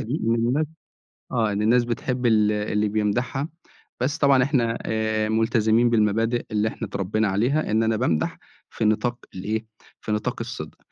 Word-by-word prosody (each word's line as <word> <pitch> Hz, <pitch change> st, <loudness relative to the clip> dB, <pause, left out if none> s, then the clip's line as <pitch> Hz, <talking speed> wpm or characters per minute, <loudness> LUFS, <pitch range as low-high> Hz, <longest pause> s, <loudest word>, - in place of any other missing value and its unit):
دي. 125 Hz, +8 st, -3 dB
إن 115 Hz, -, +3 dB
الناس 125 Hz, +7 st, +1 dB, 0.7 s
آه 110 Hz, -4 st, +1 dB
إن 100 Hz, +1 st, -1 dB
الناس 120 Hz, +3 st, +4 dB
بتحب 125 Hz, +1 st, -2 dB
ال 105 Hz, -2 st, +4 dB
اللي 105 Hz, 0 st, 0 dB
بيمدحها 120 Hz, +8 st, -1 dB, 0.5 s
بس 145 Hz, +5 st, 0 dB
طبعًا 140 Hz, -3 st, +5 dB
إحنا 120 Hz, -4 st, +1 dB
آآ 110 Hz, -1 st, 0 dB
ملتزمين 110 Hz, +1 st, +3 dB
بالمبادئ 115 Hz, +2 st, +1 dB
اللي 105 Hz, 0 st, +1 dB
إحنا -, -, -5 dB
اتربينا 100 Hz, +2 st, 0 dB
عليها 120 Hz, +9 st, +1 dB
إن 110 Hz, +1 st, +2 dB
أنا 110 Hz, -1 st, +1 dB
بامدح 80 Hz, -6 st, 0 dB, 0.3 s
في 110 Hz, -, -3 dB
نطاق 110 Hz, +3 st, +1 dB, 0.2 s
الإيه 110 Hz, +4 st, -3 dB, 0.3 s
في 105 Hz, -, -4 dB
نطاق 120 Hz, +4 st, -1 dB
الصدق. 115 Hz, -10 st, -6 dB
110 Hz, 160 wpm, -24 LUFS, 105-120 Hz, 0.7 s, طبعًا